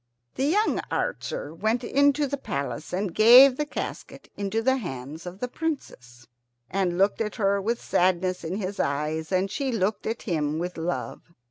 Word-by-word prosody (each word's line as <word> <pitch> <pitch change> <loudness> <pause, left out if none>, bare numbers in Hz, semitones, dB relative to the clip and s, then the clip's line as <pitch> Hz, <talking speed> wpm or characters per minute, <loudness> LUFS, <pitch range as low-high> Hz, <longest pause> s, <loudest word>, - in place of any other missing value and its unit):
The 265 - -1
young 410 +9 +2
archer 160 - -3
went 220 +8 0
into 285 +3 +3
the 280 0 -2
palace 140 - -4
and 185 0 -2
gave 250 +6 +8
the 300 +2 -2
casket - - -7
into 205 +3 -2
the 260 +2 +3
hands 155 - -7
of 180 +1 -7
the 250 - -2
Princess, 130 - -5 0.5
and 180 -1 0
looked 195 +4 +2
at 210 -2 -2
her 200 -3 +1
with 230 +4 -1
sadness 185 0 +1
in 165 +3 -3
his 200 -1 -4
eyes, 155 +3 -1
and 190 +1 +1
she 270 +3 -2
looked 210 -2 -1
at 225 +1 -3
him 155 -5 -1
with 175 +2 -3
love. 170 0 -5
195 Hz, 170 wpm, -26 LUFS, 170-245 Hz, 0.5 s, gave